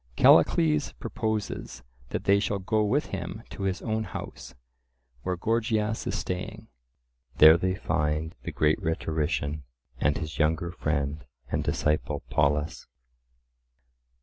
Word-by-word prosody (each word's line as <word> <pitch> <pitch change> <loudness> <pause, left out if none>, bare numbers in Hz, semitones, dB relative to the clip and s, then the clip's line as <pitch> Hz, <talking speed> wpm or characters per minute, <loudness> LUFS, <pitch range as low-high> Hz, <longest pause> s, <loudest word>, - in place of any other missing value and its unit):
Callicles 75 -2 +5
proposes 105 - -4 0.3
that - - -3
they 100 +1 +4
shall 100 -1 -1
go 105 +3 +1
with 130 +8 0
him 95 +4 -5
to - - -8
his 95 -1 -1
own 110 0 -1
house, 65 - -8 0.7
where 90 +4 -1
Gorgias 110 +2 0
is - - -1
staying. 90 -1 -5 0.7
There 80 +1 +9
they 90 +2 0
find 75 0 -1
the - - -5
great 75 +6 +2
rhetorician 80 -3 -1 0.4
and 75 0 +2
his 75 -2 -6
younger 80 +2 +1
friend 75 -3 -2 0.3
and - - 0
disciple 75 -2 0
Polus. 75 +2 +1
85 Hz, 120 wpm, -27 LUFS, 75-100 Hz, 0.7 s, There